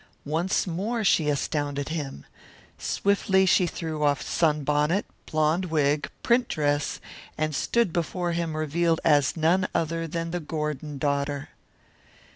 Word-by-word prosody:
Once 165 +6 0
more 205 +6 -2
she 160 -6 +3
astounded 145 0 -1
him. 145 - -5 0.5
Swiftly 195 -1 +2
she 180 -1 +4
threw 160 -2 -4
off 145 -1 +3
sunbonnet, 150 +3 +1 0.3
blonde 155 +4 +2
wig, 150 -3 +1
print 240 0 +3
dress, 145 -1 0 0.4
and 155 0 -1
stood 230 +4 +1
before 175 +1 -1
him 165 -2 -2
revealed 165 +2 +1
as 145 -1 +3
none 175 +4 +3
other 165 0 -1
than 165 +1 -3
the 175 - -2
Gordon 150 -2 -4
daughter. 140 0 -1
155 Hz, 125 wpm, -26 LUFS, 150-175 Hz, 0.5 s, she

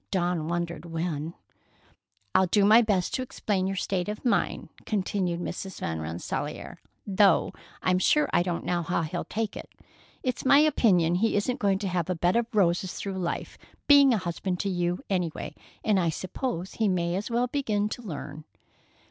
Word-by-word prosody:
Dawn 175 -4 0
wondered 170 -2 -3
when. 165 -1 -3 1.0
"I'll 190 0 +4
do 200 +2 +3
my 220 +3 +7
best 200 -6 0
to - - 0
explain 205 -6 -1
your 195 - -2
state 190 0 -1
of 210 +3 -6
mind," 240 - 0 0.2
continued 185 -4 -1
Mrs. 185 +1 -5
Van 80 -1 -3
Rensselaer, 80 +2 -5 0.2
"though 195 -2 +3 0.3
I'm 185 0 +3
sure 300 +10 +3
I - - +4
don't 175 -1 -2
know 175 -1 0
how 170 0 -1
he'll 170 +3 -4
take 220 -2 -3
it. - - -8 0.5
It's 250 -2 -2
my 275 +1 +6
opinion 205 - +4
he 220 +6 +1
isn't 245 +6 0
going 200 -2 +2
to 200 0 -3
have 180 -2 -1
a 180 - 0
bed 175 +4 +1
of 235 -1 +2
roses 185 -3 +1
through 195 -1 -4
life, 175 -2 -4 0.3
being 285 -2 +7
a 230 - +3
husband 180 0 -3
to 200 - -1
you, 175 -1 -1
any 180 -4 0
way, - - -6 0.3
and 210 -3 +3
I 170 -2 +2
suppose 185 - -4
he 220 - +1
may 175 -2 0
as 200 +5 -3
well 235 +1 +1
begin 225 -6 0
to 245 - -6
learn." 150 - -7
185 Hz, 180 wpm, -27 LUFS, 175-210 Hz, 1.0 s, my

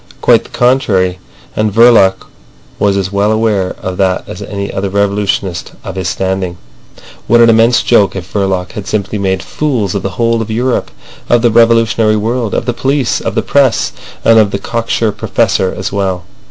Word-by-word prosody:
Quite - - +3
the - - -14
contrary; 105 -8 +1 0.4
and 110 0 0
Verloc 110 -4 +4 0.5
was 100 -1 +2
as 95 0 -2
well 100 +1 +1
aware 110 -4 0
of 95 -1 -4
that 95 -2 0
as 90 - -8
any 100 -1 -5
other 95 0 -2
revolutionist 100 -2 -1
of - - -6
his 95 -2 -2
standing. 95 -1 -2 0.7
What 120 +2 +4
an 115 0 +6
immense 115 +2 +3
joke 100 -6 +3
if 90 -2 -8
Verloc 95 -3 -1
had 105 - -7
simply 105 0 -2
made 95 -1 -1
fools 125 -11 -2
of 100 - -2
the 95 -1 -5
whole 115 -1 +1
of 115 - -5
Europe, 120 +3 -1 0.4
of 120 0 +3
the 120 - +3
revolutionary 115 -1 +3
world, 115 +1 -2
of - - -1
the 120 - -1
police, 135 0 -1
of - - -4
the - - 0
press, 135 -4 +1 0.3
and 115 0 +6
of 105 -2 +3
the 100 - -2
cocksure 115 +1 -1
Professor 95 -2 0
as 95 - -5
well. 95 -3 -2
105 Hz, 180 wpm, -13 LUFS, 95-115 Hz, 0.7 s, an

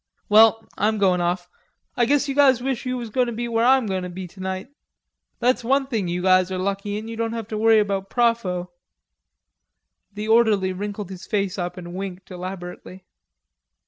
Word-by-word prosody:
Well, 220 +1 +6
I'm 215 +2 +2
going 185 -3 +2
off, 175 +1 -1 0.5
I 240 - +3
guess 285 +3 +2
you 275 - -1
guys 270 -3 +5
wish 260 0 -3
you 255 0 -1
was 235 -3 -6
going 250 +2 +1
to - - -2
be 235 +1 -3
where 230 -1 +1
I'm 260 0 +4
goin' 190 -2 -2
to 180 - -5
be 180 +1 -7
tonight.... 190 +4 -6 0.7
That's 250 0 +1
one 270 +3 +2
thing 225 -8 -2
you 175 +1 -2
guys 185 0 +4
are 185 - -2
lucky 200 +2 -2
in, 215 - -6
don't 230 0 -2
have 225 -3 -5
to 215 - -3
worry 225 0 +5
about 200 -2 0
propho." 230 -7 0 1.4
The 210 +1 -6
orderly 220 -5 +3
wrinkled 205 0 -5
his 185 -2 -9
face 200 -2 -1
up 175 0 -4
and 175 -1 -8
winked 190 0 -7
elaborately. 185 0 -8
205 Hz, 185 wpm, -23 LUFS, 185-230 Hz, 1.4 s, Well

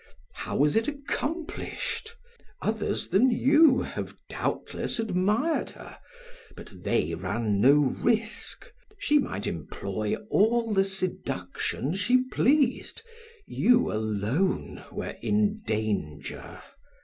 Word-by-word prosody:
"How - - -5
was 145 +1 +3
it 225 0 +2
accomplished? 305 +9 -4 0.5
Others 220 -1 -1
than 200 +9 +5
you 275 +4 +5
have - - -6
doubtless - - -3
admired 220 - +1
her, - - -12 0.6
but - - -11
they 80 +2 +1
ran 100 +4 -1
no 135 +5 +7
risk. 215 - 0 0.3
She 295 -6 +3
might 100 - -3
employ 100 +5 -3 0.2
all 225 +1 +3
the 195 -1 +4
seduction 165 - -3
she 245 +7 +3
pleased; 275 - +1 0.4
you 245 +2 +3
alone 110 - -1
were - - -5
in 210 +1 +1
danger. 100 -10 -3
205 Hz, 100 wpm, -27 LUFS, -, 0.6 s, no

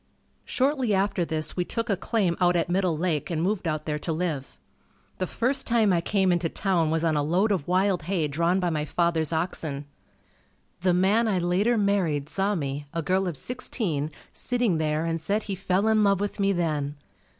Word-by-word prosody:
Shortly 260 -5 +1
after 195 -1 +1
this 155 -2 -3
we 180 - 0
took 230 +6 -3
a 200 - +2
claim 190 -2 0
out 175 0 +4
at 170 0 0
Middle 180 -3 +1
Lake 165 -1 -1
and 165 -3 -1
moved 185 +1 0
out 155 -1 -2
there 150 -1 -2
to 165 - -3
live. 155 -5 -3 0.6
The 185 - -1
first 265 +7 -1
time 225 -5 +3
I 170 - +2
came 190 +1 +2
into 175 -1 +1
town 175 -5 0
was 160 +1 0
on 160 -2 +2
a 145 - +2
load 180 +8 +2
of 180 -8 -1
wild 185 +1 +2
hay 175 -6 +1
drawn 170 +5 +1
by 180 -2 0
my 150 -2 -1
father's 165 0 0
oxen. 160 -4 -2 0.9
The 180 -1 +2
man 205 +6 +3
I 200 -4 +1
later 185 +7 +2
married 180 -9 +1
saw 200 +3 0
me, 145 -2 -4
a 165 - -1
girl 185 +3 +1
of 170 -5 -2
sixteen, 175 - -3 0.2
sitting 240 -9 0
there 155 +1 0
and 165 -1 -2
said 205 +6 0
he 200 - -4
fell 190 +2 0
in 220 -1 +4
love 200 -2 +3
with 205 +1 -3
me 200 0 +3
then. 155 -5 -1
180 Hz, 200 wpm, -26 LUFS, 160-200 Hz, 0.9 s, out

